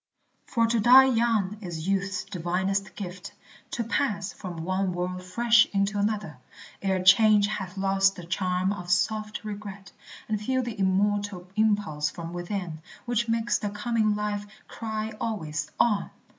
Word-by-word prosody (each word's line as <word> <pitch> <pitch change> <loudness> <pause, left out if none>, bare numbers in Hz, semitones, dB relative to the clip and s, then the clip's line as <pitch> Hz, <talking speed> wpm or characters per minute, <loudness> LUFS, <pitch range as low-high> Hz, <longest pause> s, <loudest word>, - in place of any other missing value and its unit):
For 230 -2 +2
to 230 0 +1
die 250 +4 +8
young 225 -4 +1
is 170 -3 -5
youth's 195 -1 0
divinest 190 +2 -2
gift; 185 -2 -7 0.4
To 235 - -2
pass 210 -4 -1
from 175 -5 -7
one 185 0 0
world 180 +1 -3
fresh 230 +5 +4
into 200 +1 +1
another, 200 -9 -2 0.4
Ere 190 -2 0
change 210 +2 +6
hath 200 -2 -4
lost 195 0 +2
the 175 - -9
charm 185 +2 0
of 180 -3 -8
soft 215 +3 0
regret, 200 -2 -7 0.4
And 215 -1 -1
feel 260 +4 0
the 230 -4 -6
immortal 195 -1 0
impulse 205 -9 +1
from 170 0 -7
within 175 -3 -4 0.2
Which 240 -1 0
makes 230 0 +1
the 205 - -2
coming 215 0 0
life 205 0 -3 0.2
cry 220 -1 -4
always, 155 -9 -3
On! 210 -4 +2
200 Hz, 145 wpm, -27 LUFS, 185-215 Hz, 0.4 s, die